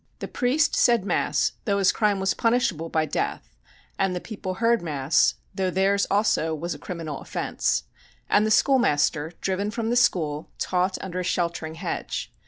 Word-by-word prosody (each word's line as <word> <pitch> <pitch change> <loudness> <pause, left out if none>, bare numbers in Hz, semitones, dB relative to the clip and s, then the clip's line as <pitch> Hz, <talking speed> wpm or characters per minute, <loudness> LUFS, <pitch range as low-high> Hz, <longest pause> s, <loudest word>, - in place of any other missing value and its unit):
The - - -6
priest 275 +4 +1
said 235 -5 +3
Mass, - - +1
though 200 -3 +1
his 195 -2 +4
crime 210 -2 +1
was 190 0 +1
punishable 230 -9 0
by 160 -1 +1
death, - - -3 0.4
and 195 -1 +1
the - - -2
people 190 -2 -6
heard 230 +3 +2
Mass, 150 -1 +2 0.2
though 190 -1 -1
theirs 195 +2 +2
also 195 -6 +1
was 170 +2 -4
a 145 - -10
criminal 160 -3 -6
offence; - - -1 0.4
and 210 - +3
the 215 - +1
schoolmaster, 165 - +2
driven 195 +2 -1
from 225 +1 -2
the - - +1
school, 165 -11 +1
taught 185 +1 0
under 185 -1 -4
a - - -2
sheltering 170 -3 -2
hedge. 170 +1 -4
185 Hz, 170 wpm, -25 LUFS, 165-210 Hz, 0.4 s, his